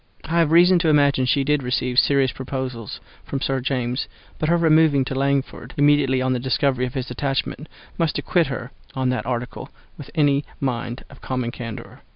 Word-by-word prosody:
I 170 +1 0
have 160 -2 +3
reason 175 +2 +6
to 165 - 0
imagine 140 -3 +3
she 140 +1 +2
did 150 +1 +1
receive 125 0 +1
serious 135 -3 +3
proposals 130 -4 -5 0.2
from 135 - -4
Sir 135 0 -1
James, 125 -1 -2 0.3
but 155 - 0
her 170 - +4
removing 155 -4 +4
from 135 - -4
Langford 140 0 -1
immediately 145 -3 +3
on 130 0 +1
the 125 - -1
discovery 130 0 0
of 125 - -10
his 130 -1 -4
attachment, 135 +3 -3 0.3
must 165 -3 +1
acquit 170 -3 +1
her 125 -1 -5 0.2
on 130 -1 0
that 125 - -2
article 125 +2 -4 0.3
with 145 - -9
any 145 -2 +3 0.2
mind 120 -2 -3
of 140 - -15
common 125 -2 -3
candour. 115 -2 -8
135 Hz, 185 wpm, -22 LUFS, 125-145 Hz, 0.3 s, reason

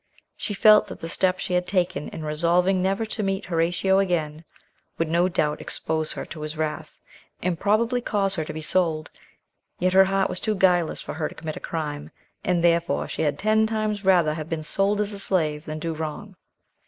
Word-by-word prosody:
She 205 - -3
felt 215 +1 +6
that - - -9
the 165 - -5
step 185 +2 +1
she 180 - -3
had 180 0 +1
taken 180 -3 0
in 155 - -7
resolving 175 +5 +2
never 195 +4 0
to 215 0 -3
meet 195 -1 -1
Horatio 175 +3 +2
again 160 -5 -1 0.5
would 165 - 0
no 170 +3 +2
doubt 150 -3 0
expose 160 -1 -2
her - - -5
to 155 - -9
his 155 +1 -5
wrath, 155 -1 -4 0.5
and 175 -2 -1
probably 230 +4 +2
cause 200 -4 +1
her 165 -4 -1
to - - -5
be 155 +1 -6
sold, 160 -2 0 0.7
yet 185 +1 +1
her 190 0 +7
heart 195 0 +1
was - - -3
too 215 - -1
guileless 180 -4 +2
for - - -6
her 155 0 -2
to - - -13
commit 155 -1 -6
a - - -5
crime, 150 -3 -4 0.3
and 175 -2 +1
therefore 170 0 +2
she - - -4
had 150 -2 0
ten 220 +1 +2
times 215 -2 -2
rather 175 -5 +4
have 155 0 -6
been 160 -2 -3
sold 200 +5 0
as 210 0 -1
a 200 - -6
slave 155 -6 -1
than 155 -1 -5
do 165 +1 -3
wrong. 160 +6 -6
175 Hz, 205 wpm, -24 LUFS, 155-195 Hz, 0.7 s, her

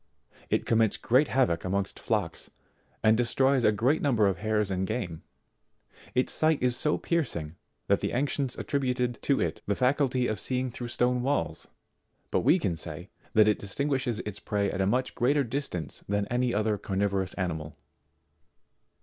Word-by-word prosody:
It - - +1
commits 115 -2 +2
great 130 +5 +3
havoc 125 -11 +1
amongst 95 +1 -1
Jlocks, - - -1 0.5
and 110 0 +5
destroys 130 +2 +2
a 105 - +5
great 125 +9 +1
number 120 -7 +3
of 95 - -1
hares 105 -2 0
and 95 0 -1
game: 85 -10 -3 0.9
its 125 - +2
sight 155 -1 +3
is 125 -1 +2
so 150 +4 +1
piercing 85 - -2 0.3
that - - +2
the - - -2
ancients 135 0 -1
attributed 125 -4 -1
to 140 - +1
it 80 -2 -2
the 100 - +1
faculty 130 0 +2
of 110 -4 -1
seeing 130 +1 -1
through 120 0 -6
stone 125 +1 +1
walls; 125 - -1 0.6
but - - +2
we 175 - +4
can 95 - -1
say, - - -6 0.2
that 110 -1 +6
it 105 - +2
distinguishes 130 +2 -1
its 105 -1 -6
prey 100 -1 -1
at 95 - -2
a 95 - +2
much 125 +5 0
greater 140 +4 +2
distance 115 - -4
than 105 0 +1
any 125 0 +1
other 105 -1 0
carnivorous 95 -1 -1
animal. 80 -5 -3
120 Hz, 165 wpm, -28 LUFS, 100-130 Hz, 0.9 s, that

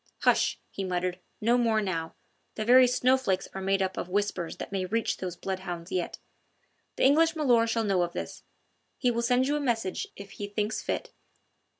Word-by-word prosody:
"Hush!" - - +3
he 195 - -4
muttered, 180 0 -2 0.2
"no 235 +3 +3
more 225 -2 +3
now. 165 -6 -3 0.4
The 215 - -3
very 250 +2 +7
snowflakes 250 -6 +2
are 190 - -5
made 195 0 +1
up 190 0 -3
of 175 - -4
whispers 190 -3 -1
that - - -7
may 195 -2 -1
reach 225 +4 -1
those 180 -2 -5
bloodhounds 180 -2 -5
yet. 180 -2 -2 0.8
The - - -1
English 325 +5 +5
milor' 245 -7 +3
shall 225 0 0
know 195 -4 +2
of 175 0 -1
this. - - -6 0.6
He 250 -2 +2
will 235 0 -1
send 250 +2 +3
you 290 - +1
a - - 0
message 225 -8 -1
if 200 0 -10
he 205 - -6
thinks 210 +1 -2
fit." - - -3
205 Hz, 190 wpm, -28 LUFS, 185-240 Hz, 0.8 s, very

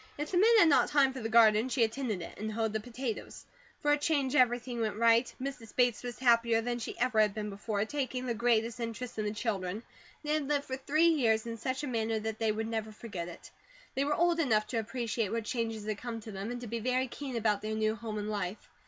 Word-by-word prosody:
If 295 +1 -4
the 365 - +1
men 430 +4 +6
had 395 - +7
not 290 - +4
time 275 -2 +4
for 260 - -6
the 225 -2 -3
garden 220 +1 +5
she 250 -2 +2
attended 220 -5 -1
it, - - -9
and 215 +1 -3
hoed 220 0 -1
the 220 - 0
potatoes. 240 +1 -6 0.4
For 295 - +2
a 295 - +3
change, 290 -3 +1
everything 245 -2 +2
went 215 -2 -1
right. 230 +2 +4
Mrs. 255 -4 -6
Bates 245 -3 +2
was 245 -1 -6
happier 235 -2 +4
than 240 +1 -2
she 230 - -6
ever 245 -2 +1
had 210 -2 +3
been 210 -1 -3
before, 205 +1 -2
taking 255 -1 -3
the 240 - 0
greatest 230 0 +1
interest 230 0 -5
in 215 - -1
the 210 - -1
children. 210 -2 -3 0.4
They 300 0 0
had 305 -3 0
lived 285 -1 0
for 260 - -3
three 310 +5 +3
years 230 -9 +2
in 230 -1 -4
such 260 +5 -3
a - - -2
manner 225 -2 -1
that 220 0 -4
they 225 -1 +2
would 220 +1 -2
never 220 -1 -3
forget 205 -6 -6
it. 175 - -11 0.4
They 270 - 0
were 295 +1 +1
old 345 0 +2
enough 220 -9 +2
to 235 - 0
appreciate 225 -2 -2
what 230 -1 -2
changes 225 -3 -3
had 215 -1 -3
come 235 -2 -5
to 220 - -9
them, 195 +2 -5
and 245 0 -4
to - - -6
be 230 +2 -3
very 255 +3 0
keen 265 +1 -6
about 215 -3 +1
their 215 0 -3
new 215 0 +1
home 220 -1 -5
and 210 0 -3
life. 200 -1 -4
230 Hz, 250 wpm, -31 LUFS, 215-255 Hz, 0.4 s, had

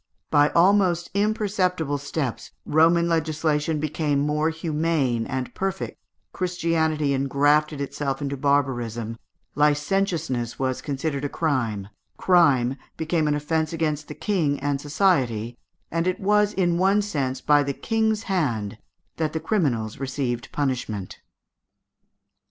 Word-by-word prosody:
By 145 0 +5
almost 180 -1 +3
imperceptible 190 -7 0
steps 140 -3 -4
Roman 165 +2 +4
legislation 155 -1 0
became 150 -1 -1
more 150 +2 +1
humane 155 -7 0
and 130 -2 -4
perfect, 195 0 -3 0.3
Christianity 160 -5 0
engrafted 145 +2 +2
itself 140 -1 -3
into 140 -1 -3
barbarism, 120 -5 -1 0.3
licentiousness 150 - 0
was 130 -1 -1
considered 140 0 -3
a 145 - -1
crime, 115 -12 -1 0.3
crime 140 -8 +3 0.2
became 160 -1 0
an 150 - +2
offence 155 +2 -1
against 155 -2 -1
the 150 - -8
King 160 -9 0
and 140 0 -1
society, 130 - +1 0.4
and 165 +2 0
it 185 - 0
was 210 +1 +3
in 175 -4 +1
one 195 +2 +3
sense 135 -9 -2
by 145 -1 +4
the 140 0 -1
King's 220 - 0
hand 115 - -1 0.4
that 155 -2 -1
the 160 - -1
criminals 125 - -1
received 130 -3 -3
punishment. 120 -9 -3
150 Hz, 120 wpm, -24 LUFS, 135-170 Hz, 0.4 s, By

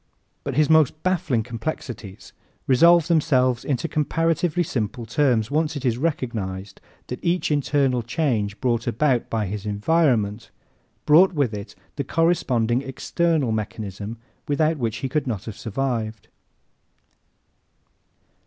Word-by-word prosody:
But 140 -3 -4
his 150 +1 +4
most 155 -1 +3
baffling 170 -11 +1
complexities 115 -4 -6 0.3
resolve 170 +5 +5
themselves 130 -7 +2
into 145 +4 -1
comparatively 165 +3 0
simple 115 -5 -3
terms 120 -1 +1
once 155 +1 0
it 140 -2 -5
is 120 -1 +1
recognized 105 - -3 0.2
that 125 - -7
each 175 -1 0
internal 140 -3 +1
change 115 -5 -1
brought 120 -3 0
about 125 +1 +1
by 110 -2 -1
his 100 +1 -5
environment 110 -1 +1 0.6
brought 180 +5 +6
with 140 -8 0
it 100 -1 -7 0.2
the 140 - -1
corresponding 130 -7 +1
external 140 +1 0
mechanism 105 0 -4 0.3
without 155 +2 +1
which 115 -4 -2
he - - +1
could 145 +2 -1
not 110 -6 -3
have 110 - -6
survived. 115 -2 -3
130 Hz, 125 wpm, -23 LUFS, 110-155 Hz, 0.6 s, brought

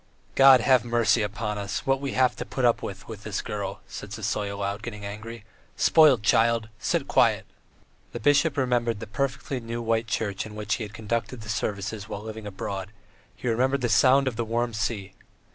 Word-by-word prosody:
"God 135 -2 +7
have 130 0 +4
mercy 120 -1 +2
upon 105 0 -3
us, 100 +1 -4
what 135 0 +1
we 140 - -3
have 130 -1 +3
to - - -3
put 130 0 -2
up 120 - +3
with 95 -1 -7
with 110 -3 -8
this 110 -3 -4
girl!" 100 -2 -5
said 105 - -8
Sisoy, 105 -1 -2
aloud, 100 +1 -3
getting 105 -3 -7
angry. 110 +2 -8 0.3
"Spoilt 145 -9 +5
child! 115 0 +3
Sit - - -1
quiet!" - - +3 0.7
The 120 - -5
bishop 145 +5 +3
remembered 120 -4 +1
the - - -6
perfectly 130 +4 -3
new 115 0 -5
white 115 0 0
church 110 -2 -2
in 110 -1 -10
which 105 -1 -2
he 115 - -4
had 105 0 -8
conducted 115 +2 -3
the 105 - -10
services 105 0 -3
while 100 - -5
living 110 -1 -7
abroad, 95 0 -5 0.4
he - - -6
remembered 130 +4 +1
the 120 - 0
sound 135 +4 +5
of 120 -4 -2
the 120 - 0
warm 115 +1 -1
sea. 105 -3 -3
110 Hz, 195 wpm, -26 LUFS, 105-120 Hz, 0.7 s, God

